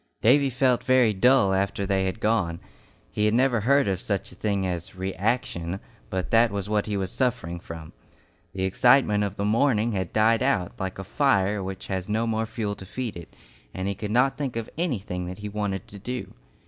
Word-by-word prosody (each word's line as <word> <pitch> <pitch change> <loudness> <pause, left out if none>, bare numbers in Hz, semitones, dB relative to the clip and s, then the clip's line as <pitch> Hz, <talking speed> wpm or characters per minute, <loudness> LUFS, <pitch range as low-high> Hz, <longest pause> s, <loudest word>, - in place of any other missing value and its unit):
Davy 135 +4 +4
felt 125 -1 +2
very 130 -4 +4
dull 105 -1 +4
after 100 +1 0
they 95 -1 +1
had 95 +3 -3
gone. 90 -7 0 0.5
He 105 - 0
had 105 +1 +3
never 125 -1 +3
heard 140 +5 +3
of 95 -2 -1
such 100 -3 -2
a - - -13
thing 100 -1 -1
as 90 0 -4
"reaction," 95 -1 -2 0.3
but 95 -1 -3
that 115 +1 +5
was 100 -1 -4
what 105 0 0
he 105 -1 -1
was 95 -1 -2
suffering 85 -10 -1
from. 80 -2 -9 0.6
The 95 -1 -3
excitement 105 +2 +4
of 100 -1 -3
the 100 - -2
morning 115 0 +2
had 95 -4 -2
died 110 +1 +3
out 90 -4 +1
like 95 0 -3
a 95 - -5
fire 105 -3 +1
which 95 0 -6
has 95 0 -4
no 110 +2 +1
more 110 0 -1
fuel 110 -2 -3
to 95 - -10
feed 125 +1 -4
it, 85 -1 -11 0.4
and 95 +1 -3
he 100 - 0
could 105 +2 -5
not 125 +5 +2
think 135 -5 -2
of 115 -1 -4
anything 100 - -2
that 90 +1 -6
he 105 0 -6
wanted 100 -2 -3
to 100 - -10
do. 125 +5 -5
105 Hz, 205 wpm, -25 LUFS, 95-115 Hz, 0.6 s, that